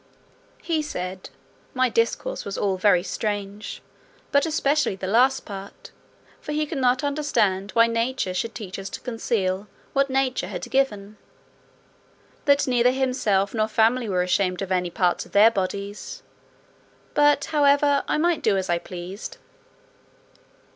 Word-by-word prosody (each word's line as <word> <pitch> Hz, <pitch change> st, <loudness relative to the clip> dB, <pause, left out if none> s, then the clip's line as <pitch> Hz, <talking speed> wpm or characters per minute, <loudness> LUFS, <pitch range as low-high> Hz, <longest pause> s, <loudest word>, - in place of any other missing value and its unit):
He 325 Hz, -2 st, 0 dB
said, 185 Hz, -10 st, -5 dB, 0.5 s
"my 255 Hz, 0 st, +3 dB
discourse 235 Hz, -, -1 dB
was 200 Hz, -, -5 dB
all 195 Hz, -2 st, 0 dB
very 185 Hz, -2 st, +3 dB
strange, 205 Hz, 0 st, -4 dB, 0.5 s
but 285 Hz, +3 st, +3 dB
especially 300 Hz, -6 st, +1 dB
the 190 Hz, -, -6 dB
last 250 Hz, +7 st, +3 dB
part; 200 Hz, -1 st, -9 dB, 0.5 s
for 300 Hz, -, -6 dB
he 305 Hz, 0 st, 0 dB
could 295 Hz, -1 st, -4 dB
not 255 Hz, +1 st, +2 dB
understand, 230 Hz, -10 st, 0 dB
why 230 Hz, 0 st, +7 dB
nature 230 Hz, -3 st, -1 dB
should 225 Hz, +4 st, -3 dB
teach 195 Hz, -3 st, -6 dB
us 195 Hz, 0 st, -6 dB
to -, -, -6 dB
conceal 210 Hz, -5 st, -2 dB, 0.3 s
what 275 Hz, 0 st, +2 dB
nature 265 Hz, -1 st, 0 dB
had -, -, -6 dB
given; 215 Hz, -6 st, 0 dB, 1.3 s
that 280 Hz, 0 st, +4 dB
neither 245 Hz, -1 st, +3 dB
himself 250 Hz, -7 st, +1 dB
nor 215 Hz, -2 st, +1 dB
family 225 Hz, +2 st, +2 dB
were 180 Hz, -2 st, +1 dB
ashamed 180 Hz, +1 st, 0 dB
of 190 Hz, -, -6 dB
any 180 Hz, -1 st, +1 dB
parts 175 Hz, 0 st, 0 dB
of -, -, -23 dB
their 215 Hz, +3 st, +7 dB
bodies; 200 Hz, 0 st, -4 dB, 0.9 s
but, 290 Hz, -1 st, +4 dB
however, 285 Hz, -1 st, +4 dB
I -, -, +1 dB
might 340 Hz, +1 st, +1 dB
do 205 Hz, -3 st, +2 dB
as 190 Hz, -1 st, -1 dB
I 170 Hz, -, +1 dB
pleased." 180 Hz, +4 st, -8 dB
225 Hz, 145 wpm, -24 LUFS, 195-270 Hz, 1.3 s, why